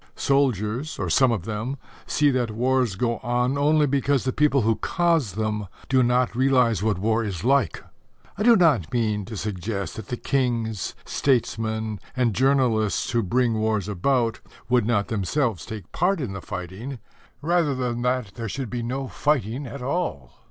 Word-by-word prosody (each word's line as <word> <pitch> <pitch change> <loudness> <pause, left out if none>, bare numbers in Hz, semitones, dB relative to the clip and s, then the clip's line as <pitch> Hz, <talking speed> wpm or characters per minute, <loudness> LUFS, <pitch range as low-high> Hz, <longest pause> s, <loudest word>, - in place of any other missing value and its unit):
Soldiers 130 0 0
or - - -2
some 130 -3 +4
of 100 -6 -2
them 115 +5 -3 0.3
see 145 -1 +3
that 125 -3 0
wars 125 -1 +1
go 115 +2 -1
on 125 +3 0
only 150 +1 +3
because 140 -1 +1
the 130 - -1
people 140 -4 +3
who 110 0 +2
cause 165 - +1
them 105 -1 -2 0.2
do 130 -1 +4
not 125 -1 +2
realize 125 -5 +3
what 105 -3 +1
war 110 +4 +1
is 100 -5 -4
like. 135 -1 +2 0.5
I - - -6
do 235 +2 +6
not 150 - +3
mean 105 -4 0
to 110 0 -7
suggest 100 0 -4
that 110 -2 -7
the 125 - -3
kings, 115 -8 -1
statesmen 110 -4 0 0.2
and 120 -4 +2
journalists 120 -4 +2
who 120 - +2
bring 115 +2 +1
wars 110 -3 0
about 115 +4 0 0.3
would 120 -3 +3
not 105 -4 +1
themselves 110 - -1
take 105 -5 -8
part 180 +2 +1
in 125 -9 -3
the 95 - -6
fighting 95 +12 -6 0.5
rather 165 -3 +2
than 125 -2 -2
that 125 -4 -1
there 115 0 -5
should 130 0 -4
be 120 -1 -2
no 130 +3 -3
fighting 135 -2 -1
at 125 +1 -7
all. 130 - -3
120 Hz, 170 wpm, -24 LUFS, 110-135 Hz, 0.5 s, do